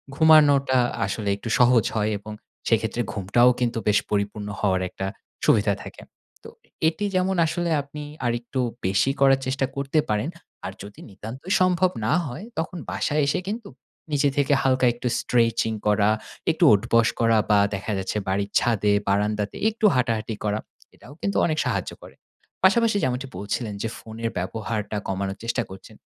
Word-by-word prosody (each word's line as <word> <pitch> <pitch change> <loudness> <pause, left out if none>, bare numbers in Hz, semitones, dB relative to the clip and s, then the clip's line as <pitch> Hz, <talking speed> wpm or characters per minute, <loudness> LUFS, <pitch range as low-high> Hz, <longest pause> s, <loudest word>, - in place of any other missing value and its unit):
ঘুমানোটা 145 -4 +5 0.3
আসলে 100 +1 -3
একটু 110 +3 -7
সহজ 120 -2 +5
হয় 110 0 +1
এবং 110 +1 -10 0.4
সে 115 - +5
ক্ষেত্রে 115 +2 -2
ঘুমটাও 110 +5 +3
কিন্তু 120 -2 0
বেশ 105 -1 +4
পরিপূর্ণ 105 0 -2
হওয়ার 95 -3 +1
একটা 95 - -5 0.4
সুবিধা 105 -1 +4
থাকে। - - -11 0.4
তো - - -10 0.4
এটি 200 +6 -1
যেমন 185 +1 +1
আসলে 170 +1 -1
আপনি 145 +2 -9 0.2
আরেকটু 120 +2 -2 0.3
বেশি 95 +8 +2
করার 135 -1 +5
চেষ্টা 135 +1 0
করতে 140 +3 0
পারেন; 105 +7 0 0.4
আর 95 - -3
যদি 100 0 -12
নিতান্তই 115 - -6
সম্ভব 185 0 +3
না 125 - +2
হয়, 130 - -7
তখন 165 +2 -3
বাসায় 110 +10 0
এসে 140 - +1
কিন্তু 215 +1 -4 0.4
নিজে 145 -1 +2
থেকে 145 0 +3
হালকা 130 -1 +2
একটু 120 +1 -4
স্ট্রেচিং 115 -2 +1 0.2
করা, 105 0 +3 0.4
একটু - - -1
ওঠবস 115 +2 +3
করা 115 -1 +4
বা 105 - +6 0.2
দেখা 95 +3 -4
যাচ্ছে 95 +2 -3
বাড়ির 100 +1 -1
ছাদে, 105 -3 +1
বারান্দাতে 105 +1 0
একটু 220 0 -2
হাঁটাহাঁটি 115 -3 0
করা, 105 0 0 0.4
এটা - - -19
ও - - -10
কিন্তু 200 - -1
অনেক 155 -2 0
সাহায্য - - -1
করে। - - -13 0.5
পাশাপাশি 220 +3 +4
যেমনটি 130 +1 -1
বলছিলেন 105 +2 -3
যে, 115 - 0
ফোনের 115 +1 -5
ব্যবহারটা 105 +3 -3
কমানোর 95 +1 -3
চেষ্টা 120 +1 -1
করছেন; 95 0 -12
115 Hz, 160 wpm, -24 LUFS, 105-140 Hz, 0.5 s, বা